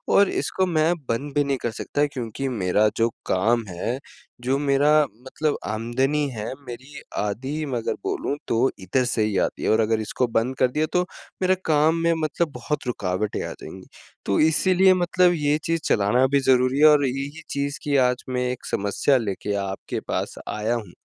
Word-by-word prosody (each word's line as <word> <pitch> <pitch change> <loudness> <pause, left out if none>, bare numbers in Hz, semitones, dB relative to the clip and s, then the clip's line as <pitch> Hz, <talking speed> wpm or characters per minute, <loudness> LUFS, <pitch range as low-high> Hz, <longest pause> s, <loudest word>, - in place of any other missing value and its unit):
और 200 -1 +6
इसको 190 - 0
मैं 165 -1 +2 0.2
बंद 140 +5 -2
भी 145 - +4
नहीं 140 -1 -1
कर 120 - 0
सकता 145 +6 -1
क्योंकि 125 +1 -4
मेरा 105 -2 +2
जो 115 0 +3 0.2
काम 115 +5 +2
है, 95 +8 -3 0.4
जो 130 +2 +1
मेरा 140 +1 +3 0.3
मतलब 150 +3 -1 0.2
आमदनी 130 +7 0
है 105 - -4 0.2
मेरी 130 +4 -9 0.2
आधी 135 +9 -3
मगर 115 -2 -1
बोलूँ 390 - -2
तो 120 +3 +2
इधर 95 +8 0
से 115 -2 +1
ही 105 -2 0
आती - - -6
है - - +1
और 110 - +3
अगर 110 0 +1
इसको 125 +3 -1
बंद 115 +3 0
कर 130 - +5
दिया 150 +3 +1
तो 180 0 +2 0.4
मेरा 185 0 +3
काम 155 +1 +3
में 170 0 +3
मतलब 155 +1 -1
बहुत 125 +2 -3
रुकावटें 100 -3 -2
आ - - -5
जाएँगी। - - -10 0.4
तो 100 - +1
इसीलिए 185 +4 +4
मतलब 180 0 +3
ये 150 -1 +1
चीज़ 165 0 0
चलाना 105 +5 +3
भी 140 +1 +2
ज़रूरी 130 0 +3
है 150 - +7
और 150 -2 +5
यही 140 +4 -4
चीज़ 140 0 -2
की 145 -1 0
आज 125 0 -3
मैं 125 0 -1
एक 125 - -7
समस्या 100 +7 +2
लेके 105 -3 -3 0.2
आपके 95 - -5
पास - - -2
आया 110 +3 -1
हूँ, 105 -6 -6
130 Hz, 185 wpm, -24 LUFS, 115-150 Hz, 0.4 s, है